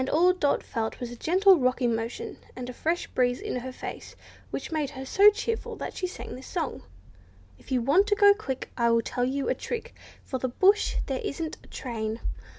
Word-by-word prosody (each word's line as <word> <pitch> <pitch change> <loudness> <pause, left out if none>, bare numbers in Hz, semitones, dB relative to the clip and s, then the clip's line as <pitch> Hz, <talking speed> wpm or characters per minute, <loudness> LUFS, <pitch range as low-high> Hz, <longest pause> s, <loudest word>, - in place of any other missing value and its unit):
All 355 +4 +5
Dot 295 -6 +1
felt 225 -2 -3
was 245 -1 -5
a - - -7
gentle 370 - +5
rocking 255 -2 +2
motion, 225 +1 -4 0.2
and 250 -1 -6
a 250 - -6
fresh 330 +7 -1
breeze 245 -1 +1
in - - -3
her 255 +1 -5
face, - - -8 0.3
which - - -5
made 305 -3 0
her 265 -2 -7
so 400 +9 +7
cheerful 450 +2 -3
that - - -6
she 365 - -2
sang 360 - -8
this 260 +1 -9
song:— 345 -4 -3 0.8
If - - -16
you 250 -2 +2
want 340 - +4
to 415 - +3
go 405 0 +7
quick, 275 -12 -5
I 235 -1 +2
will 230 0 +3
tell 245 +2 -1
you 270 +2 -1
a - - +3
trick 475 - -5 0.3
For 260 - -4
the 255 - -1
bush, 390 +11 +3
where - - -1
there 265 -2 -2
isn't 320 +2 -3
a - - -17
train. 225 -3 -4
265 Hz, 215 wpm, -27 LUFS, 245-365 Hz, 0.8 s, so